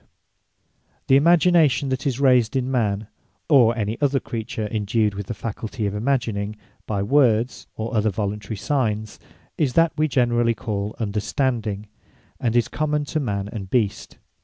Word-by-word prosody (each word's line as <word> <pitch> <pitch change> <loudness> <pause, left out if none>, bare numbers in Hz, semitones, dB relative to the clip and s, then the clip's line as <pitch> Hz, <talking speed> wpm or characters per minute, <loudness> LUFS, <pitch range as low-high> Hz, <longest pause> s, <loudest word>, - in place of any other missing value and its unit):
Understanding - - -43
The 135 - +7
Imagination 165 -3 +4
that 130 +2 -2
is 130 -3 -1
raysed 125 -4 +3
in 130 0 0
man 110 -4 0 0.4
(or 120 -6 +5
any 110 +3 -2
other 140 -1 +2
creature 110 -1 -4
indued 105 0 0
with 100 -1 -6
the 115 - -4
faculty 110 +1 -4
of 100 - -1
imagining) 110 -3 -1 0.3
by 100 -2 -1
words, 120 -1 +2
or 115 +2 -4
other 110 0 +2
voluntary 105 +1 -3
signes, 110 -3 -1 0.4
is 140 -5 +1
that 165 -1 +3
we 155 +1 +2
generally 120 -3 +2
call 105 -2 -4
Understanding; 110 0 -2 0.5
and 120 -1 -1
is 120 -2 +3
common 150 -1 -1
to 155 - -2
Man 100 -7 -2
and 100 -4 -7
Beast. 110 -4 -1
115 Hz, 155 wpm, -23 LUFS, 105-135 Hz, 0.5 s, The